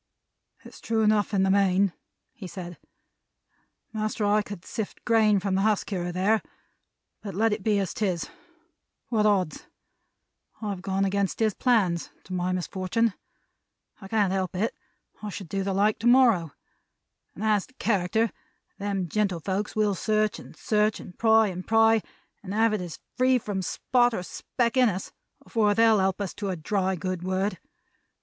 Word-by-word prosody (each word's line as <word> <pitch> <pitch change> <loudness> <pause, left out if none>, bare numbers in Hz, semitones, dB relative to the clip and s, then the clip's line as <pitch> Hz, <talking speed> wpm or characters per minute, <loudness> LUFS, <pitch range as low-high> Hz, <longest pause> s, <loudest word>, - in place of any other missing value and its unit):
"It's - - -13
true 225 -1 0
enough 210 -1 +2
in 195 -2 +2
the 190 - +3
main," 195 -1 +3 0.4
he 225 -8 -9
said, 175 -1 -8 1.1
"master, 215 0 -1
I 210 +1 +3
could 205 -3 -9
sift 220 -3 -6
grain 220 -3 +4
from 195 0 -2
the 190 - +2
husk 215 0 +1
here 180 -3 -2
and 175 - -4
there, 210 +4 +2 0.8
but 200 -3 -7
let 220 +2 +2
it 210 - -3
be 210 +1 +2
as 195 -3 -1
'tis. 185 -6 -1 0.8
What 215 -3 +2
odds? 190 -6 0 0.9
I 215 - -4
have 190 -2 -5
gone 195 +1 0
against 195 0 0
his 220 -2 +2
plans; 195 -10 +1
to 185 - -9
my 180 0 -1
misfortun'. 190 +4 0 0.9
I 195 - -9
can't 205 -2 +1
help 190 -1 -2
it; 215 +5 0 0.5
I 210 - -5
should 195 -2 -7
do 195 +4 -2
the 195 +1 -1
like 205 +3 +2
to 230 - 0
morrow. 235 - +5 0.9
As 210 -2 +1
to 255 - -26
character, 220 +1 +1 0.5
them 200 -2 -2
gentlefolks 195 +1 -1
will 210 -2 +2
search 215 +2 0
and - - -13
search, 210 0 +1
and 180 - -11
pry 220 -1 +4
and 185 0 -7
pry, 225 0 +4 0.4
and 200 0 -6
have 225 0 +3
it 210 - -1
as 175 -3 -6 0.2
free 255 0 +4
from 205 -5 -3
spot 240 +5 +1
or 180 - -3
speck 235 +6 -2
in 250 -2 +5
us, 190 -1 -5 0.3
afore 210 -3 +2
they'll 225 -1 +5
help 190 0 +1
us 195 - -3
to 200 -2 -4
a 185 - -1
dry 190 +3 -1
good 185 +1 -3
word! 190 +3 -1
205 Hz, 170 wpm, -26 LUFS, 190-220 Hz, 1.1 s, morrow